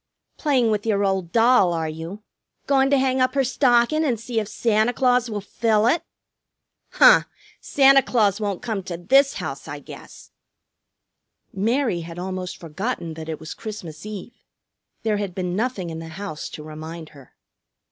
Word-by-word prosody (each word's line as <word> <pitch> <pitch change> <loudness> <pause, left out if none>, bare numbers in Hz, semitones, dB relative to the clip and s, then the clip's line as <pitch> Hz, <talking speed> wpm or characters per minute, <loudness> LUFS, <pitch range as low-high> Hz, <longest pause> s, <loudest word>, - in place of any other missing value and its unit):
"Playing 260 -7 +2
with 210 -1 -1
your 205 -3 +1
old 190 -3 -1
doll, 230 -6 +4
are 165 -1 -2
you? 165 +6 -7 0.4
Goin' 270 -1 +3
to 280 - +4
hang 260 -1 +1
up 255 +2 +1
her 275 - +3
stockin' 255 +3 +2
and 250 -7 0
see 230 0 -2
if 210 - -3
Santa 220 +2 +1
Claus 250 -1 +2
will 210 -2 -3
fill 215 +1 +1
it?" 315 +8 +3 0.9
"Huh! - - +7 0.3
Santa 275 -1 +5
Claus 215 -5 +1
won't 200 -3 -3
come 220 -4 -2
to 180 -2 -6
this 270 +11 +3
house, - - -6
I - - -6
guess!" - - -13 1.2
Mary 225 0 0
had 165 +1 -9
almost 185 0 -5
forgotten 170 +1 -4
that 160 0 -8
it 155 - -4
was 160 +1 -7
Christmas 185 -8 -8
Eve. 215 +3 -9 0.6
There 215 -2 +1
had 200 -3 -4
been 180 -1 -2
nothing 205 -6 -2
in 160 - -6
the 165 - -8
house 165 -1 -6
to 150 - -9
remind 155 +1 -8
her. 140 -4 -17
210 Hz, 165 wpm, -23 LUFS, 175-245 Hz, 1.2 s, Huh